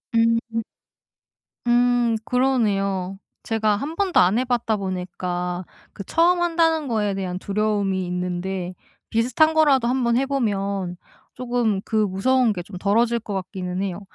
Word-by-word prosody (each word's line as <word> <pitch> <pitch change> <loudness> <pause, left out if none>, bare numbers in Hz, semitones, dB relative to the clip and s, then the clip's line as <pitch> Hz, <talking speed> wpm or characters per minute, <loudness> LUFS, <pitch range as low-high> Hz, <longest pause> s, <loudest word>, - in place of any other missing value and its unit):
음. 230 0 +1 1.0
음. 240 -1 +3
그러네요. 200 -7 0 0.3
제가 220 -2 +1
한번도 330 - 0
안 185 +5 +4
해 255 - +1
봤다 235 -3 0
보니까 180 -1 -3 0.3
그 200 - -7
처음 345 - +3
한다는 325 -3 +2
거에 210 -4 0
대한 185 -2 -3
두려움이 200 -2 0
있는데 180 +1 -3 0.4
비슷한 255 +8 +2
거라도 280 -6 +4
한번 245 -2 +1
해 270 - +2
보면 200 -8 -1 0.4
조금 240 -5 -1
그 220 - -5
무서운 215 +4 +2
게 180 - -5
좀 185 +1 -9
덜어질 230 +5 +2
것 210 -2 -7
같기는 185 -1 -4
해요. 190 -2 -3
215 Hz, 265 characters per minute, -23 LUFS, 190-245 Hz, 1.0 s, 안